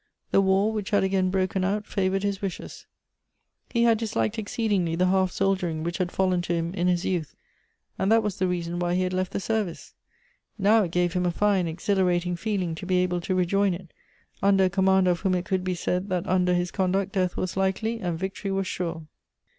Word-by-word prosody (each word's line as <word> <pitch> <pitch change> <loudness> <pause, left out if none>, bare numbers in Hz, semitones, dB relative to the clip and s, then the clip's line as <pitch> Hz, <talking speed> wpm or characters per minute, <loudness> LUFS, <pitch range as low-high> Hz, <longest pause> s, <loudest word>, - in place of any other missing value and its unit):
The - - +5
war, 195 +3 +2
which 210 -3 -3
had 205 - +2
again 190 -1 +1
broken 190 0 0
out, 205 +2 -1
favored 195 0 -1
his 200 -1 -1
wishes: 195 -3 -6 0.8
he 235 -1 +1
had 230 -2 +4
disliked 115 - -1
exceedingly 205 -6 0
the 180 +2 +2
half 185 0 +2
soldiering 185 -5 0
which 170 +1 -3
had 180 -1 -1
fallen 185 -2 +1
to 175 0 -2
him 170 +1 -2
in 180 -2 0
his 180 0 +1
youth, 170 -5 -2 0.6
and 195 - +1
that 225 0 +5
was 210 -3 -2
the 185 - +2
reason 175 -1 -2
why 175 0 0
he 185 - +1
had 185 0 -2
left 185 0 -1
the - - -2
sei 220 +2 0
vice. 175 -5 -8 0.6
Now 210 +2 +4
it - - -5
gave 175 0 +1
him 180 -1 0
a - - +1
fine 195 -1 +1
exhilarating 180 +1 0
feeling 185 -2 -2
to 160 +3 -7
be 185 -1 +2
able 180 -1 +1
to 185 +2 -1
rejoin 185 +1 +2
it, 175 -1 -12 0.5
under 195 -1 +4
a 185 - +3
commander 190 -1 +3
of 175 - -1
whom 190 0 +1
it 180 0 -2
could 185 -1 -1
be 185 0 -1
said, 180 +3 -2
that 180 -2 -1
under 180 -1 +2
his 175 0 -1
conduct 190 +1 0
death 185 -2 -1
was 185 - -2
likely, 195 +4 0
and 175 -5 -2
victory 190 +2 -4
was 195 0 -1
sure. 170 -3 -4
185 Hz, 215 wpm, -26 LUFS, 175-195 Hz, 0.8 s, The